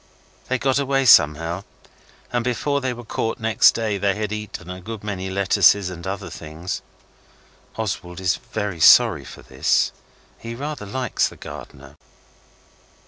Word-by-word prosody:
They 130 - 0
got 135 +1 +1
away 135 -1 +1
somehow, 80 - +5 0.7
and 120 -1 +1
before 140 +4 -1
they 130 -1 -1
were 120 -1 -8
caught 115 +1 -3
next 110 -2 +4
day 110 -3 -1
they 100 0 +1
had 105 -1 -3
eaten 105 -4 -6
a 90 0 -7
good 110 +2 -7
many 95 -3 -4
lettuces 100 0 +3
and 85 0 -8
other 95 -2 -5
things. 80 +2 -6 0.9
Oswald 95 -5 -4
is 90 -2 +1
very 100 -5 -5
sorry 80 - +6
for - - -11
this. - - +1 0.5
He 115 0 -7
rather 145 -4 -5
likes 125 +5 0
the - - -12
gardener. 70 +1 -11
100 Hz, 145 wpm, -22 LUFS, 90-115 Hz, 0.9 s, sorry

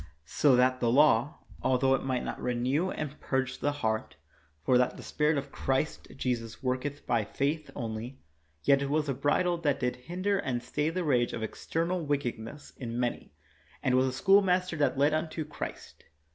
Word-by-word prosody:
So 130 - +4
that 130 +1 +3
the 120 - +2
law, 135 -1 +4 0.2
altho 130 +1 +3
it 135 - 0
might 130 -2 -1
not - - -5
renew 130 +8 0
and 150 -4 -5
purge 130 -1 -1
the 145 - +1
heart 110 -7 -2 0.2
— 75 0 -36
for 130 - +4
that 125 - +1
the - - -9
spirit 150 0 +1
of 140 0 -4
Christ 135 +4 -1
Jesus 120 -3 -3
worketh 130 +3 -2
by 115 -2 +1
faith 145 +8 -2
only 115 +3 -5 0.2
— 75 0 -41
yet 140 - +4
it 140 - -1
was 150 +1 +1
a 135 - 0
bridle 170 +6 +1
that 145 -4 +1
did 125 -1 -1
hinder 185 +9 -1
and 125 -9 -2
stay 150 +4 -1
the 180 +2 -2
rage 125 -6 +2
of 115 - -3
external 165 +9 -2
wickedness 140 -2 -3
in 120 -2 -4
many, 120 -1 -2 0.5
and 130 -3 +2
was 130 +1 +4
a - - -1
schoolmaster 185 +2 +3
that 145 -2 +1
led 145 +2 +3
unto 155 0 -2
Christ. 150 - -8
135 Hz, 185 wpm, -29 LUFS, 125-150 Hz, 0.5 s, So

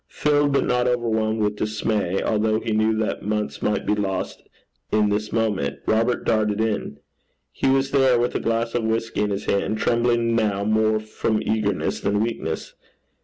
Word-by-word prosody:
Filled 145 -1 +1
but 140 - +2
not 125 0 +1
overwhelmed 110 -3 0
with 105 0 -1
dismay, 105 -3 -1
although 110 0 +1
he 115 0 -4
knew 110 +1 +2
that 110 -1 -1
months 105 0 -3
might 105 -1 0
be - - +2
lost 100 -2 -2 0.5
in 105 -1 +3
this 105 +1 -1
one 115 0 +2
moment, 70 -6 -3
Robert 115 +3 +1
darted 110 -2 +1
in. 110 -9 -1 0.5
He - - -1
was 135 0 +2
there, 135 -3 +4
with 120 +1 0
a - - -1
glass 115 0 -1
of 120 - 0
whisky 115 -1 -1
in 105 - +1
his 100 0 -3
hand, 100 +2 0
trembling 115 0 +1
now 105 -3 +1
more 110 +1 +2
from 110 0 -2
eagerness 105 -3 -1
than 100 +1 0
weakness. 105 -8 -3
110 Hz, 175 wpm, -23 LUFS, 105-115 Hz, 0.5 s, there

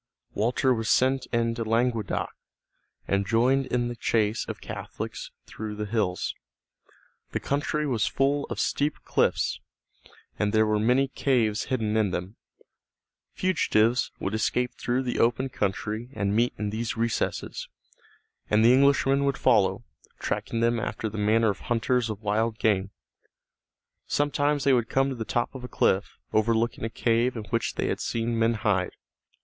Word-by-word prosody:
Walter 125 +4 +2
was 115 -2 -2
sent 130 0 +2
into 115 0 0
Languedoc, 115 -2 0 0.8
and 100 0 +1
joined 130 +5 +2
in 120 -1 0
the 120 - -4
chase 110 -2 0
of - - -5
Catholics - - -6 0.2
through 105 -1 -6
the 105 0 -3
hills. 100 -4 -1 1.0
The - - 0
country 145 +2 -1
was 125 -6 +1
full 140 +1 +1
of - - -5
steep 145 +1 0
cliffs, - - +1 0.8
and 105 0 +1
there 110 0 +4
were 105 0 +1
many 125 +5 +3
caves 120 -5 +1
hidden 110 -4 -1
in 110 -2 +2
them. 90 +3 -4 1.0
Fugitives 125 -10 +2
would 95 - -3
escape 125 +3 0
through 125 +2 -1
the 125 - -2
open 120 +3 +2
country 105 +2 -2
and 100 -4 -1
meet 120 +2 +2
in 105 -1 -2
these 115 +2 -3
recesses, 115 0 -2 0.8
and 105 +1 +4
the 120 - +7
Englishmen 140 0 +4
would 140 -1 0
follow, 110 -7 +3 0.3
tracking 115 - -2
them 115 0 +2
after 110 0 -3
the 105 +1 -6
manner 110 +1 +3
of 100 - -8
hunters 120 0 0
of 110 0 -6
wild 110 +2 0
game. 100 -4 +1 1.2
Sometimes 145 0 +1
they 140 - +4
would 120 -2 +1
come 135 +1 +2
to 135 - -3
the 115 - -4
top 120 +2 -1
of 130 -2 -8
a - - -5
cliff, 95 -4 +1 0.2
overlooking 115 +2 +1
a 115 - -1
cave 120 +2 +1
in 110 - -4
which 115 -1 0
they - - -1
had - - -1
seen 115 0 -1
men 115 +1 +3
hide. 100 -4 0
115 Hz, 155 wpm, -26 LUFS, 110-125 Hz, 1.2 s, the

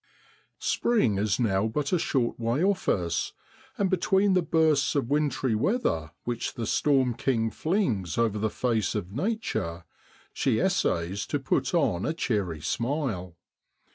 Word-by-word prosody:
PKING 130 - +1
is 105 +2 0
now 105 -3 +2
but 140 +8 -2
a 180 - +3
short 125 -7 0
way 120 +7 0
off 195 0 +1
us, 85 -3 0 0.4
and 200 - +2
between 190 +2 +2
the 185 - +4
bursts 155 -4 +2
of 140 -3 0
wintry 140 -4 +1
weather 110 - 0
which 120 0 -3
the 115 - -3
storm 135 0 +2
king 115 -2 0
flings 120 - -1
over 110 -3 +1
the 110 +1 0
face 110 -4 0
of 95 -3 -3
Nature 125 - -2 0.5
she - - +1
essays 85 +5 0
to 145 - -1
put 135 +6 0
on 125 - +1
a 160 - -1
cheery 95 - -1
smile. 115 - -2
120 Hz, 145 wpm, -27 LUFS, 100-155 Hz, 0.5 s, the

